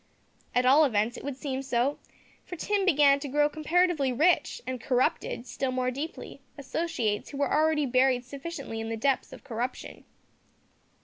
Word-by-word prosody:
At 250 0 +3
all 280 +5 +6
events 230 -3 +1
it - - -9
would 280 -2 -5
seem 270 -1 -3
so, 265 +1 0 0.4
for 355 - -8
Tim 400 +3 0
began 285 -4 +5
to 285 - -5
grow 295 +2 +2
comparatively 310 -2 +1
rich, 320 - +2
and 255 -2 -4
corrupted, 250 -1 0
still 260 +1 -3
more 255 0 0
deeply, 295 +6 -7 0.2
associates 275 -7 -2
who 280 - -7
were 280 0 0
already 310 -1 +2
buried 255 -1 +2
sufficiently 275 -3 -6
in 225 - -5
the 225 - -3
depths 270 +3 0
of - - -12
corruption. 250 -1 -5
275 Hz, 165 wpm, -28 LUFS, 250-300 Hz, 0.4 s, all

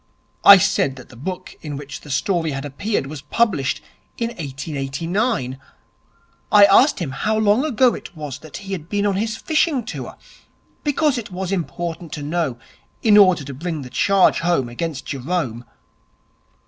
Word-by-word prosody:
I 200 - +11
said 185 -8 +1
that 130 - -13
the - - -14
book 180 +9 -6
in 145 -3 -5
which 145 0 -8
the 150 - -13
story 165 +4 0
had 135 +1 -4
appeared 145 +5 -2
was 145 0 -7
published 150 - 0 0.3
in 230 -1 -1
1889. 145 - -3 0.9
I 205 -1 +8
asked 250 +9 +5
him 160 -7 -3
how 215 +11 -1
long 215 +4 +3
ago 260 -4 +3
it - - -9
was 145 -3 -6
that 155 -1 -9
he 195 - -7
had 170 -4 -5
been 205 0 0
on 200 -2 +1
his 220 +2 -2
fishing 310 -6 +1
tour, 235 - -7 0.7
because 290 -2 +1
it 225 - -8
was 185 0 -4
important 170 -2 -4
to 145 - -5
know 150 -5 -1 0.5
in 215 -2 +5
order 185 -7 +6
to 140 0 -7
bring 160 +1 -4
the 125 - -10
charge 195 +5 +3
home 165 -8 +1
against 135 +2 -4
Jerome. 130 -4 -3
175 Hz, 165 wpm, -21 LUFS, 140-205 Hz, 0.9 s, I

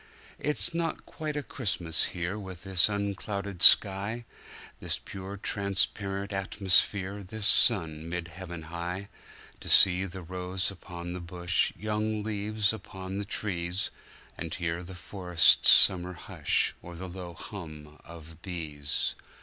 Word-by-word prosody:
It 150 0 -2
is 175 - +3
not 170 0 -3
quite 155 -1 -5
a 145 - -3
Christmas 90 - 0
here 90 +2 -4
with 95 -3 -9
this 95 0 +6
unclouded 100 -2 -4
sky, 100 +5 +5 0.5
This - - -2
pure 95 +1 -9
transparent 100 0 -2
atmosphere, 95 0 +2
this 105 +2 -4
sun 80 -9 +4
mid 90 -1 -4
heaven 85 -1 -9
high; 85 +4 -6 0.5
To - - -6
see 95 0 +7
the 95 0 -8
rose 90 +2 -2
upon 85 -2 -8
the 90 - -6
bush, 90 +1 0
young 110 0 -2
leaves 105 0 -1
upon 95 -2 -7
the 100 - -4
trees, 95 -3 -2 0.5
And 80 0 -5
hear 85 -1 -3
the 90 +1 -10
forest's 90 -2 +3
summer 90 -1 +6
hush 90 - -1
or 90 0 -10
the 95 +3 -7
low 90 -1 -8
hum 75 -5 -10
of 80 -1 -13
bees. 75 -6 -3
95 Hz, 135 wpm, -28 LUFS, 85-100 Hz, 0.5 s, see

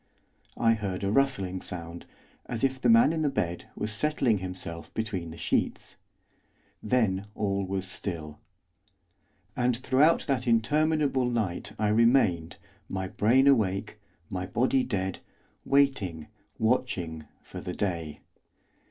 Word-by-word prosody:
I 115 -1 +4
heard 100 -4 -3
a 100 - 0
rustling 100 -9 +1
sound, 85 -1 -6 0.4
as 120 0 -3
if 130 -1 +1
the 120 - +3
man 115 +7 +6
in 160 - -1
the 150 - +2
bed 90 -9 -2
was 105 - -3
settling 130 -4 +1
himself 90 -3 -6
between 100 -7 -3
the 80 - -9
sheets. - - -1 0.9
Then 105 -4 +1
all 100 -2 -1
was 95 0 -2
still. 85 -5 -6 1.2
And 125 -1 +1
throughout 135 +6 +3
that 130 -3 -1
interminable 135 +2 +2
night 105 -4 -2
I 105 -1 +1
remained, 105 -7 +3 0.3
my 95 -1 -3
brain 120 +7 +3
awake, 105 -8 +2 0.3
my 90 +1 -4
body 130 +6 +2
dead, 95 -6 -2 0.5
waiting, 120 - +2 0.3
watching, 95 -10 -1 0.2
for - - -9
the 90 - -5
day. 85 -6 -3
105 Hz, 125 wpm, -28 LUFS, 90-130 Hz, 1.2 s, man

